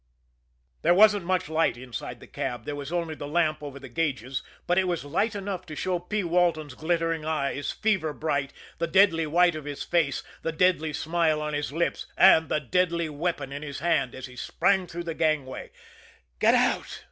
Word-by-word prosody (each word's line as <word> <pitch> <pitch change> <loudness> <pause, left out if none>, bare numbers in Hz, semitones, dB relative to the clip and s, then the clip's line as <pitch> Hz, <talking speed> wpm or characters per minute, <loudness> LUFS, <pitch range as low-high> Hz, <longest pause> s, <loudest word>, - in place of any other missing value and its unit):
There 175 - +4
wasn't 205 -2 +6
much 185 -2 0
light 160 -5 +1
inside 125 -1 -7
the - - -12
cab 125 -2 -4
there 145 - -3
was 145 +1 -6
only 170 -2 -1
the 145 -2 -7
lamp 155 0 +1
over 140 -2 -7
the 135 -1 -10
gauges 130 -2 -2 0.2
but 175 +1 +3
it 185 - +1
was 175 -5 -2
light 200 +9 0
enough 195 -2 -4
to 155 - -7
show 180 +3 -1
P. 205 +4 -2
Walton's 170 -4 +1
glittering 165 +1 -1
eyes, 145 -2 -2
fever 195 -8 0
bright, 145 -2 -2 0.3
the 170 - 0
deadly 165 -3 +4
white 175 +3 +4
of 155 -2 -7
his 145 -1 -5
face, 165 -6 0 0.2
the 165 - -2
deadly 160 -1 +2
smile 160 0 +1
on 150 0 -3
his 145 -1 -2
lips, 170 +3 -1
and 160 -1 +6
the - - +1
deadly 170 +2 0
weapon 145 -2 -3
in 140 +1 -5
his 145 -2 -6
hand, 155 -5 0
as 130 - -7
he 125 -1 -12
sprang 190 +8 +1
through 175 +1 -6
the 165 -1 -4
gangway. 155 -5 -1 0.7
"Get - - +5
out!" - - +1
160 Hz, 195 wpm, -26 LUFS, 145-175 Hz, 0.7 s, wasn't